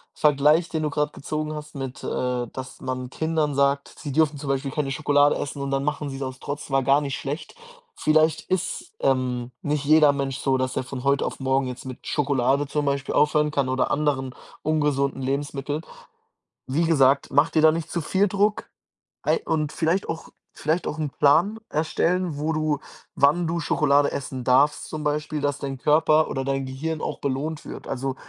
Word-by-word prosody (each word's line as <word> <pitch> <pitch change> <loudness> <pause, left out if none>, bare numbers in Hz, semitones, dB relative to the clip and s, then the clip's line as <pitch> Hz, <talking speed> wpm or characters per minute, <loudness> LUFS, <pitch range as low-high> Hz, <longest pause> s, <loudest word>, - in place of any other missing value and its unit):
Vergleich, 150 +3 +4
den 160 -1 -2
du 150 - 0
grad 150 +1 -1
gezogen 155 +1 -4
hast 150 0 -8
mit, 135 -1 -6
äh, 125 -1 -1
dass 130 -1 -8
man 130 -1 -4
Kindern 160 -2 0
sagt, 140 0 +1
sie 145 - -6
dürfen 150 0 +2
zum 140 - -5
Beispiel 135 0 -1
keine 140 -1 -2
Schokolade 145 0 +3
essen 140 0 -4
und 140 - -3
dann 135 0 0
machen 150 0 -2
sie's 135 0 -5
aus 130 0 -6
Trotz, 145 0 -6
war 135 0 +3
gar 140 +2 +4
nicht 140 -2 -3
schlecht. 145 - -5 0.4
Vielleicht 155 0 +3
ist 320 - -2
ähm, 125 -2 0
nicht 145 -1 -1
jeder 155 0 +6
Mensch 135 -1 -3
so, 135 -1 +1
dass 130 0 -2
er - - -1
von 130 0 -7
heute 140 0 +2
auf - - -6
morgen 135 0 +1
jetzt 125 +1 -7
mit 130 -1 -8
Schokolade 140 -1 +1
zum 145 0 -1
Beispiel 140 0 -1
aufhören 150 0 +3
kann 140 -3 0
oder 130 0 0
anderen 140 -3 0 0.3
ungesunden 145 -3 +1
Lebensmitteln. 140 +2 -2 0.9
Wie 150 +6 +1
gesagt, 140 -4 +4
mach 145 +4 +4
dir 160 -1 +1
da 160 - +7
nicht 165 -1 -4
zu 170 - -2
viel 195 +6 +2
Druck. 205 +3 0 0.6
Ey, 450 - +1
und 150 -2 0
vielleicht 170 +4 0
auch 165 - -5 0.2
vielleicht 160 +4 -1
auch 150 - -3
'n 155 -2 -2
Plan 170 +12 +3
erstellen, 165 +1 0
wo 155 +2 -1
du 155 -2 0 0.4
wann 160 +5 +3
du 170 +1 -1
Schokolade 145 -2 +2
essen 130 -2 -5
darfst 135 +4 +3
zum 155 -1 -5
Beispiel, 150 +1 -1
dass 145 -1 -1
dein 135 -1 -4
Körper 155 +3 +4
oder 135 - -2
dein 135 0 -1
Gehirn 155 +4 -4
auch - - -4
belohnt 145 +3 -3
wird. - - -8
Also, 135 +1 -3
145 Hz, 190 wpm, -24 LUFS, 135-155 Hz, 0.9 s, da